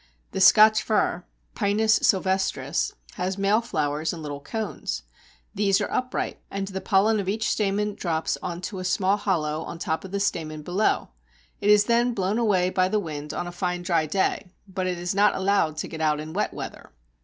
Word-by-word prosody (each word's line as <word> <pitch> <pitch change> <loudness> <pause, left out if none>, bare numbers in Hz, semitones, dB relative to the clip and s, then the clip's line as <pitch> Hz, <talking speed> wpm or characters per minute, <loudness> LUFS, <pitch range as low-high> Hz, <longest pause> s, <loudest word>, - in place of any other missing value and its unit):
The 190 - -2
Scotch 215 +3 +7
fir 180 -5 0 0.3
(Pinus 215 +1 +2
sylvestris) 190 -7 +1 0.3
has 185 +2 -2
male 200 +3 +3
flowers 155 -7 -1
in 165 -3 -7
little 145 -1 -5
cones. 220 +9 -4 0.5
These 200 -1 +2
are 205 - -2
upright, 255 0 -2
and 195 0 -3
the 190 -1 -5
pollen 210 +2 +3
of 190 -1 -2
each 220 +2 -1
stamen 210 0 0
drops 165 -5 -1
on 175 0 -5
to 190 +1 -5
a - - -4
small 185 +2 +2
hollow 160 -7 -1
on 165 - -7
the - - -5
top 160 - -2
of 190 - -8
the 200 +2 -2
stamen 155 -5 -2
below. 185 +7 0 0.5
It 205 - 0
is 210 0 +7
then 235 +1 +2
blown 195 +3 0
away 185 -5 +2
by 185 0 +2
the 215 - +1
wind 150 -5 -5
on 175 - -3
a 175 - -6
fine 180 0 -2
dry 170 -3 +1
day, 190 +2 0 0.2
but 190 -1 -3
it 180 -1 -2
is 175 +2 -2
not 205 +2 +4
allowed 190 -5 +1
to - - -3
get 160 -1 -7
out 150 -1 +2
in 155 +1 -7
wet 205 - 0
weather. - - -8
190 Hz, 200 wpm, -25 LUFS, 170-205 Hz, 0.5 s, Scotch